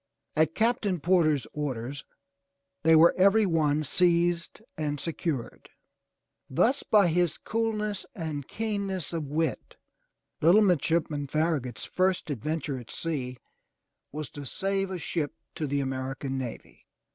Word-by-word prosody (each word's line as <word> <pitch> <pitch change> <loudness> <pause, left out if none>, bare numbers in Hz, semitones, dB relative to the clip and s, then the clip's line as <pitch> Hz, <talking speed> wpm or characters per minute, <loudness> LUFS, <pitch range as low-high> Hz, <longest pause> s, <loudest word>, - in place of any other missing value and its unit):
At 155 0 +2
Captain 220 -5 +1
Porter's 155 -6 +3
orders, 135 -2 -4 0.8
they 160 +1 +6
were 165 +2 +7
every 200 +3 +5
one 155 -4 +2
seized 170 +2 +1 0.2
and 150 -2 -2
secured. 160 -6 -4 0.8
Thus 255 - +2
by 210 -3 +4
his 175 -1 +1
coolness 215 -2 -2
and 155 -7 -4
keenness 200 -6 -3
of 160 -3 -2
wit, 155 +1 -2 0.7
little 175 +7 +6
midshipman 160 -5 +1
Farragut's 145 -6 -1
first 185 -4 0
adventure 145 +1 -2
at 120 - -12
sea 130 -6 -3 0.7
was 150 0 -5
to 145 - -8
save 195 +6 -1
a 190 - -3
ship 160 -3 -2 0.2
to 155 - -3
the 140 0 0
American 135 0 -3
navy. 130 -3 -7
160 Hz, 120 wpm, -28 LUFS, 145-185 Hz, 0.8 s, were